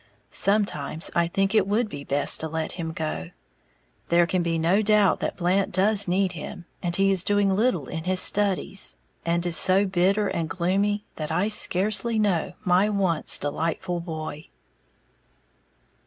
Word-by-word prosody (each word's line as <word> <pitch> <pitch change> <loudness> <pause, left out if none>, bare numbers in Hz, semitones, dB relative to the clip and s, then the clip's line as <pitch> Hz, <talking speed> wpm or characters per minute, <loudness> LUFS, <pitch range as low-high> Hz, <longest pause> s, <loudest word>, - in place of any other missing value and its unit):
Sometimes 195 -7 +1
I 170 0 +1
think 195 +4 -1
it 210 -3 +2
would 215 +3 0
be 145 -8 -8
best 140 0 +2
to 160 - -3
let 160 0 -4
him 165 -2 -5
go, 155 - -5 0.8
there 170 0 +4
can 185 +1 -1
be 170 -1 -1
no 170 +6 +2
doubt 210 -2 +3
that - - -4
Blant 185 +2 0
does 200 +2 +2
need 185 +1 +1
him, 175 +1 -8 0.2
and 175 -1 -2
he 195 +1 +2
is 190 -2 +2
doing 205 -1 +1
little 240 +5 0
in 160 -1 -6
his 185 0 +2
studies, 195 -1 +2 0.3
and 170 +1 0
is 175 -1 0
so 190 +2 +4
bitter 195 +2 +1
and 165 -4 -3
gloomy 200 +4 -1
that 155 0 -5
I 180 +6 0
scarcely 210 +2 +1
know 200 -6 0
my 185 +3 +3
once 190 -6 +1
delightful 165 +4 -3
boy. 160 -2 -7
185 Hz, 160 wpm, -24 LUFS, 165-200 Hz, 0.8 s, there